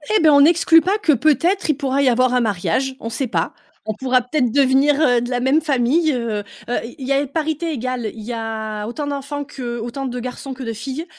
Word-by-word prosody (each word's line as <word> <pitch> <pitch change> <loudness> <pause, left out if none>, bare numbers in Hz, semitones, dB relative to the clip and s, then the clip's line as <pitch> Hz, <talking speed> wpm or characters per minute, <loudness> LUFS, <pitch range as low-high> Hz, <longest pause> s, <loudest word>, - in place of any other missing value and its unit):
Eh 425 - +4
beh, 315 - +6
on 285 -1 +6
n'exclut 330 +1 +5
pas 385 +5 +1
que 410 -7 +2
peut-être, 315 - +1
il 305 - +3
pourra 275 0 0
y 270 - +4
avoir 250 +1 +2
un 250 - +3
mariage. 215 +5 -1
On 230 - -5
sait 255 +3 -2
pas. 230 - -1 0.4
On - - 0
pourra 255 +3 +1
peut-être 250 -1 0
devenir, 275 +2 +3
heu, 245 -6 +3
de 240 - -4
la 245 -1 -1
même 265 +5 +2
famille, 295 +2 +2
heu. 235 -4 -2 0.3
Heu, 245 - 0
il 235 - -9
il 260 - -6
y 275 - +2
a 280 +1 +1
parité 315 +3 -2
égale. 250 -5 -3
Il 225 - -10
y 235 +3 -5
a 220 -2 -4
autant 285 +6 -4
d'enfants 285 0 -4
que 245 -4 -6
autant 240 +4 -5
de 250 -1 -4
garçons 255 +2 -6
que 260 +1 -8
de 230 -2 -3
filles 265 +8 -5
265 Hz, 240 wpm, -20 LUFS, 240-295 Hz, 0.4 s, beh